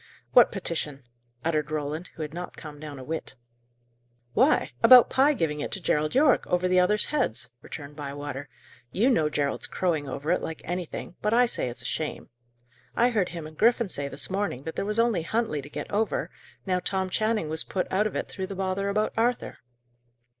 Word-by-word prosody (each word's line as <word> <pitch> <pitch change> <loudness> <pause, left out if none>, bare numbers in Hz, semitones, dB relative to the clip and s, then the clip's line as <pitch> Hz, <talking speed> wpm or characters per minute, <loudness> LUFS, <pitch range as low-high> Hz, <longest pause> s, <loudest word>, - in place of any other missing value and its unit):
"What 245 - +7
petition?" 160 -8 -2 0.4
uttered 155 -2 0
Roland, 155 +3 -3
who 160 - -4
had 150 0 -6
not 180 +1 -7
calmed 150 -2 -10
down 150 -2 -7
a 130 - -8
whit. 160 +4 -5 1.0
"Why! - - +3
about 250 -2 +9
Pye 285 +3 +4
giving 150 - -1
it - - -3
to 195 - +1
Gerald 155 -1 0
Yorke, 275 -1 +4
over 180 +1 +1
the 185 0 +4
others' 210 +4 +3
heads," 120 - 0
returned 145 -1 -9
Bywater. 145 -1 -6 0.4
"You 235 +8 +3
know 155 -10 +2
Gerald's 145 -1 -1
crowing 160 -6 -1
over 150 +4 -2
it, 180 - +2
like 160 - -6
anything, 175 0 -5
but 210 +2 +2
I 245 +1 +6
say 230 - -1
it's 120 0 -8
a - - -11
shame. 155 -2 -3 0.6
I 245 +2 +4
heard 205 -6 +1
him 170 -2 -6
and 155 0 -10
Griffin 235 +2 +3
say 140 -5 -1
this 140 +1 -2
morning 190 -9 -2
that 160 - -6
there - - -2
was 210 +1 -2
only 230 -6 +3
Huntley 215 -4 -1
to 140 - -11
get - - -6
over, 215 +2 0 0.3
now 185 -2 +1
Tom 190 +1 -1
Channing 215 -5 +1
was 160 +1 -2
put 185 - -2
out 205 +3 +2
of - - -7
it - - -2
through 190 -1 -5
the 195 - -6
bother 190 +1 -1
about 215 +2 0
Arthur." 240 +2 0
180 Hz, 200 wpm, -27 LUFS, 150-210 Hz, 1.0 s, about